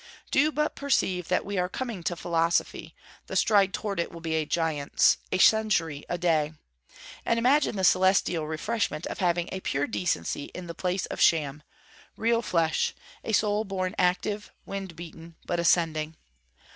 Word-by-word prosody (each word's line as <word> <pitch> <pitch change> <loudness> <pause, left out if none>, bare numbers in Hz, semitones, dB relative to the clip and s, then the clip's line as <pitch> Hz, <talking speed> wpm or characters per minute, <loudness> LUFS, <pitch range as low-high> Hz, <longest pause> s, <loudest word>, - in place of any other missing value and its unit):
Do 295 +3 +3
but 300 0 0
perceive 185 -11 0
that 180 - 0
we 200 -1 -2
are 180 0 0
coming 235 -4 -4
to 175 - 0
philosophy, 170 0 -1 0.3
the - - -6
stride 200 -3 +4
toward 200 -2 -3
it 170 - -1
will 170 - -9
be 165 -1 -3
a 160 -1 0
giant's 160 -4 +2
a - - +1
century 185 -9 +3
a 175 - -1
day. 160 -3 +1 0.7
And 230 - +1
imagine 260 +2 +3
the 190 - -2
celestial 185 -3 +3
refreshment 170 +2 -2
of - - -5
having 175 -2 +1
a 190 - -3
pure 140 -5 -1
decency 145 - -2
in 180 - -6
the 170 - -6
place 180 +2 -2
of - - -7
sham; 150 -3 +3 0.6
real 230 +1 +2
flesh; 165 -7 0 0.3
a - - -3
soul 210 0 +2
born 185 -3 -3
active, 190 +3 0 0.2
wind 195 -3 -6
beaten, 165 0 -11
but 175 - -1
ascending. 160 -2 +1
180 Hz, 165 wpm, -27 LUFS, 165-205 Hz, 0.7 s, stride